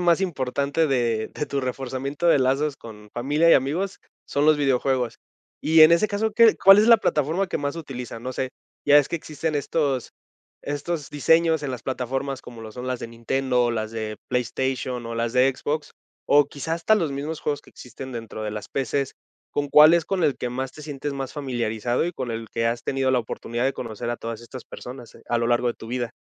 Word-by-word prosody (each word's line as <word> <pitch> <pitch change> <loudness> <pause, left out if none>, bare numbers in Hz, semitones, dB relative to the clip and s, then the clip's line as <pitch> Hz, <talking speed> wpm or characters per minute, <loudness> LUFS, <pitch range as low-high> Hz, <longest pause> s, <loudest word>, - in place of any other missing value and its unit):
más 175 0 +3
importante 140 -2 0
de 120 -5 0
de 150 - -3
tu 140 - -2
reforzamiento 135 +4 -2
de 165 - +6
lazos 135 +2 +1
con 105 -2 -12
familia 145 +7 +2
y - - +8
amigos, 165 +9 0 0.3
son 145 +2 0
los 155 - +6
videojuegos. 130 -3 0 0.4
Y 160 +1 +4
en 155 +1 +10
ese 170 +5 +4
caso, 210 +2 -1
¿qué 230 0 +6
cuál 195 +1 +8
es 215 - +5
la 230 -1 +8
plataforma 160 +6 0
que - - -2
más 145 +1 -2
utilizan? 125 -7 -7
No 130 - -4
sé, 130 0 -3 0.4
ya 145 - +6
ves 145 - +5
que - - -1
existen 155 -1 -3
estos 140 -3 -1 0.5
estos 145 +1 -4
diseños 160 +1 +3
en 135 - -2
las 120 - -6
plataformas 135 +1 -3
como 120 -2 -11
lo 110 - -8
son 125 +3 -7
las 125 -1 -2
de 115 - -5
Nintendo 125 +2 0
o 120 - +1
las 110 -1 -2
de 110 -1 -4
PlayStation, 125 0 -2
o 115 - -5
las 115 0 -1
de 130 +1 +4
Xbox, 150 +4 -3 0.3
o 145 0 +5
quizá 145 +3 -5
hasta 170 +6 +3
los 165 -9 0
mismos 145 +3 -4
juegos 145 -1 -2
que - - -18
existen 130 +2 -10
dentro 115 -2 -6
de 105 - -3
las 105 -1 -6
PC, 135 +1 -2 0.4
¿con 145 0 -2
cuál 150 +3 +8
es 170 -1 +3
con 185 0 -1
el 145 -4 +2
que 125 - -3
más 130 +2 -3
te 150 - -11
sientes 145 -1 -5
más 135 -1 -5
familiarizado 120 -4 -1
y 175 - -3
con 130 -6 -4
el 115 0 -4
que 115 - -2
has 115 +1 -2
tenido 135 -1 0
la 130 - +3
oportunidad 120 +1 -3
de 135 - +2
conocer 115 0 -6
a 120 - -1
todas 115 -1 -6
estas 120 +1 -10
personas, 125 -2 -10
eh, - - -18
a 120 - +2
lo 115 0 0
largo 120 +1 +2
de 120 - 0
tu 115 - -11
vida? 120 -1 -3
135 Hz, 220 wpm, -24 LUFS, 120-150 Hz, 0.5 s, en